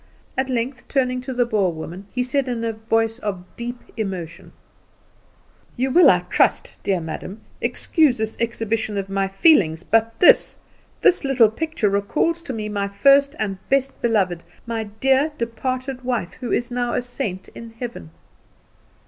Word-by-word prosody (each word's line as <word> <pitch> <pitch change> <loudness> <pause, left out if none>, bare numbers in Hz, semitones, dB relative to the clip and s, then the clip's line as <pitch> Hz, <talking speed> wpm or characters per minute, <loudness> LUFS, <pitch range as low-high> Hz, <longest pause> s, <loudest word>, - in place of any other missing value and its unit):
At 265 0 -1
length, 250 +1 -3
turning 255 -2 0
to 255 - -6
the 245 -1 +1
Boer 205 -6 +1
woman, 170 +4 -8
he 250 - -1
said, 265 +1 0
in 240 -2 -2
a 225 -1 -1
voice 225 +1 0
of 195 -6 -4
deep 240 +1 -5 0.2
emotion: 185 -6 -5 1.3
"You 260 +2 0
will, 355 +6 +7
I - - +4
trust, - - +1
dear 190 -2 0
madam, 170 +6 -7 0.2
excuse 305 -7 +2
this 220 0 -3
exhibition 225 -2 -1
of 195 -1 -3
my 195 0 0
feelings; 195 - +3
but 225 +2 +1
this 355 - +5 0.5
this 365 - +4
little 255 -6 +4
picture 315 -3 -1
recalls 300 +12 0
to 290 - -6
me 215 -2 -4
my 200 -1 -2
first 275 +7 +4
and 195 -3 -3
best 275 0 0
beloved, 190 -7 +1 0.2
my 230 -2 -3
dear 265 +8 +1
departed 255 +3 -3
wife, 245 -8 -2
who 250 -2 -4
is 240 +1 0
now 245 0 -1
a - - +1
saint 230 -7 -4
in 230 -1 -11
heaven." 235 - -6
230 Hz, 160 wpm, -22 LUFS, 200-255 Hz, 1.3 s, will